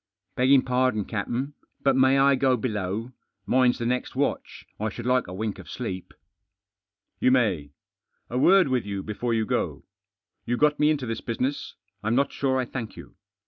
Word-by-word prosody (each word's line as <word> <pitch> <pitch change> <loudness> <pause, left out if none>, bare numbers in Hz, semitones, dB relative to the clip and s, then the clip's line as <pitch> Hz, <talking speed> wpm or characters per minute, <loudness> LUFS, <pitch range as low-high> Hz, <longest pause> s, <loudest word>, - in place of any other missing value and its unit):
"Beggift' 130 +1 +4
pardon, 125 -5 +1
captain, 120 +6 -3 0.3
but 135 -1 +4
may 130 +1 +4
I 140 +1 +5
go 130 -1 +2
below? 105 0 -3 0.3
Mine's 125 -1 +3
the 120 - -3
next 125 +1 -1
watch. - - -2
I 110 +1 -1
should 120 +3 -8
like 125 0 +2
a 90 - -7
Wink 105 +1 -3
of - - -11
sleep." 95 -7 -6 1.0
"You - - +4
may. 95 - +1 0.5
A 125 - -2
word 185 +5 +6
with 130 -2 0
you 100 -1 -4
before 115 +2 -2
you 110 -1 +1
go. - - -2 0.6
You 120 +1 -1
got 150 +1 +3
me 150 0 +4
into 145 -4 0
this 115 -1 -4
business. 130 +5 -3 0.3
I'm 110 +3 0
hot 140 - +2
sure 130 -1 0
I 130 - 0
thank 115 -3 -6
you. - - -11
125 Hz, 180 wpm, -26 LUFS, 110-130 Hz, 1.0 s, word